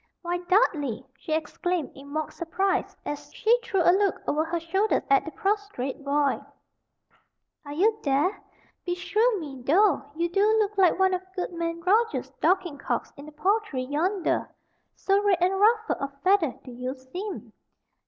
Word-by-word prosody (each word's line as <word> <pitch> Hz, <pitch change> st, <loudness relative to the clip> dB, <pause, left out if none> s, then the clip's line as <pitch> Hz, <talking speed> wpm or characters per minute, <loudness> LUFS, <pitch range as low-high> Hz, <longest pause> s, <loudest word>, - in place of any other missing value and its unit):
"Why, 350 Hz, 0 st, -1 dB
Dudley," 340 Hz, -, +1 dB
she 310 Hz, -, -9 dB
exclaimed, 335 Hz, 0 st, -2 dB
in 275 Hz, +1 st, -13 dB
mock 310 Hz, +2 st, -3 dB
surprise, 370 Hz, +4 st, -1 dB
as 295 Hz, 0 st, -6 dB
she 455 Hz, +1 st, +4 dB
threw 390 Hz, -6 st, +1 dB
a 350 Hz, -, +6 dB
look 395 Hz, -1 st, +2 dB
over 305 Hz, +2 st, +1 dB
her 335 Hz, +1 st, -2 dB
shoulder 385 Hz, +6 st, +1 dB
at 275 Hz, -, +5 dB
the -, -, -4 dB
prostrate 390 Hz, -, -2 dB
boy, 285 Hz, 0 st, +1 dB, 1.2 s
"are 285 Hz, -, -9 dB
you 430 Hz, +7 st, +2 dB
there? 290 Hz, +8 st, +1 dB, 0.4 s
Beshrew 395 Hz, +6 st, +1 dB
me, 275 Hz, -5 st, -8 dB
though, 360 Hz, +10 st, +4 dB
you 340 Hz, +2 st, 0 dB
do 390 Hz, +4 st, +1 dB
look 425 Hz, -1 st, +1 dB
like 375 Hz, -3 st, +4 dB
one, 380 Hz, 0 st, +3 dB
of 365 Hz, -, 0 dB
goodman 335 Hz, -2 st, -3 dB
Roger's 440 Hz, +6 st, +1 dB
Dorking 360 Hz, -6 st, +1 dB
cocks -, -, -3 dB
in 285 Hz, +2 st, -11 dB
the -, -, -10 dB
poultry 370 Hz, -4 st, 0 dB
yonder, 330 Hz, +7 st, 0 dB, 0.5 s
so 395 Hz, +1 st, +2 dB
red 405 Hz, -3 st, +3 dB
and 370 Hz, +2 st, +2 dB
ruffled 440 Hz, +1 st, +3 dB
of 275 Hz, 0 st, -5 dB
feather 370 Hz, -7 st, +3 dB
do 255 Hz, -, -10 dB
you 250 Hz, +2 st, -4 dB
seem. 355 Hz, +11 st, -7 dB
355 Hz, 160 wpm, -26 LUFS, 290-395 Hz, 1.2 s, a